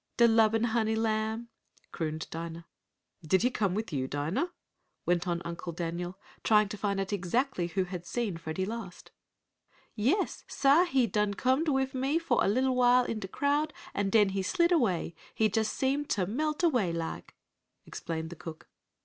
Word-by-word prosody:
"De 235 - +7
lubbin 225 0 +4
honey 220 -1 +1
lamb!" 220 +1 -1 0.4
crooned 155 -1 -3
Dinah. 165 0 -6 0.6
"Did 180 +6 +2
he 250 - +3
come 200 -6 0
with 215 -4 -3
you, 130 -2 -1
Dinah?" 155 - -1 0.5
went 175 0 +1
on 170 0 -1
Uncle 170 0 -5
Daniel, 175 +2 -4 0.3
trying 210 -2 +4
to 210 - -4
find 200 -1 -1
out 195 +1 -2
exactly 200 +1 0
who 190 +2 0
had 180 -1 -7
seen 210 -2 -2
Freddie 165 +3 -3
last. 215 -4 -7 0.8
"Yais, 265 - 0
sah, 285 +6 +4
he 270 -8 +2
done 210 -2 0
comed 260 - +1
wif 265 -1 +1
me 270 +4 +1
fo' 335 0 +1
a - - +2
little 255 +5 +2
while 250 0 +5
in 225 - -3
de 195 - -5
crowd, 290 +8 0 0.2
an' 200 -1 0
den 210 -1 +5
he 195 0 -1
slid 340 - +2
away 215 - +1 0.2
he 220 -1 +3
just 220 +1 0
seem 275 +2 0
t' 205 -9 0
melt 300 - -2
away 245 - +3
laik," 165 - -5 0.5
explained 160 0 -5
the - - -7
cook. 160 0 -9
215 Hz, 175 wpm, -30 LUFS, 175-255 Hz, 0.8 s, De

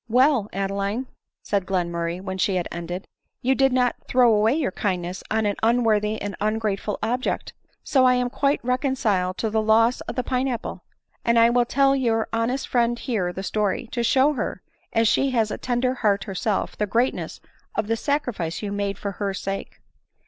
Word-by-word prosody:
" - - -42
Well, 260 -7 +3
Adeline," 200 +5 -2 0.4
said 195 -3 -1
Glenmurray 170 -2 -1
when 190 -1 -5
she 190 +1 +2
had 180 -2 -1
en 170 0 -5
ded, 180 +3 -5 0.2
" - - -54
you 260 +2 +3
did 270 0 +3
not 250 -1 +2
throw 245 -2 +5
away 215 +4 +3
your 300 -11 0
kindness 180 -2 -2
on 220 0 +1
an 205 -1 0
un 235 +2 +3
worthy 215 -1 +1
and 205 -1 -4
ungrateful 215 -1 -1
object; 245 +4 -1 0.3
so 265 -2 +3
I 250 0 +5
am 250 0 0
quite 280 -2 0
reconciled 245 -8 0
to 220 - -1
the 220 0 +2
loss 225 +3 +3
of - - -6
the 250 - -1
pine 255 +1 0
apple; 240 -4 -4 0.4
and 235 0 +3
I 230 0 +6
will 240 0 +3
tell 275 +2 +3
your 230 -4 +1
honest 230 +4 0
friend 240 -1 +1
here 215 -9 -1
the 190 +2 -6
story 210 +3 -1
— - - -36
to 240 - -1
show 265 +5 +4
her, 270 - -4 0.3
as 225 0 +3
she 275 +5 +3
has 220 -2 +2
a - - -4
tender 250 0 0
heart 210 -5 +1
herself, 200 +1 -2
the 210 - -1
greatness 235 +5 -1 0.4
of 220 - 0
the 225 +2 0
sacrifice 230 - -2
you 205 - -3
made 200 -1 -2
for 200 - -4
her 195 0 -3
sake." 195 +1 -5
220 Hz, 200 wpm, -24 LUFS, 200-250 Hz, 0.4 s, I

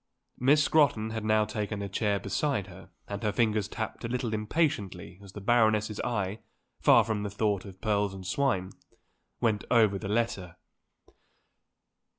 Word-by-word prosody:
Miss 145 +4 +4
Scrotton 140 -9 +3
had 110 -1 -4
now 110 0 +3
taken 105 -1 -3
a - - -3
chair 100 +1 0
beside 130 +2 -1
her 95 0 -13 0.2
and 100 0 -5
her 105 -2 0
fingers 110 -2 +1
tapped 110 +2 -5
a - - -2
little 120 -1 -2
impatiently 105 - -1
as 100 -2 -13
the 105 - -8
Baroness's 110 -1 +2
eye 105 -3 -2 0.4
far - - +6
from 110 -2 -2
the 105 - -3
thought 100 -1 -1
of 95 -1 -11
pearls 105 -2 0
and 95 -1 -9
swine 100 -7 0 0.7
went 110 -4 +1
over 110 -5 +4
the 100 - -5
letter. 105 -6 -1
105 Hz, 160 wpm, -29 LUFS, 100-115 Hz, 0.7 s, far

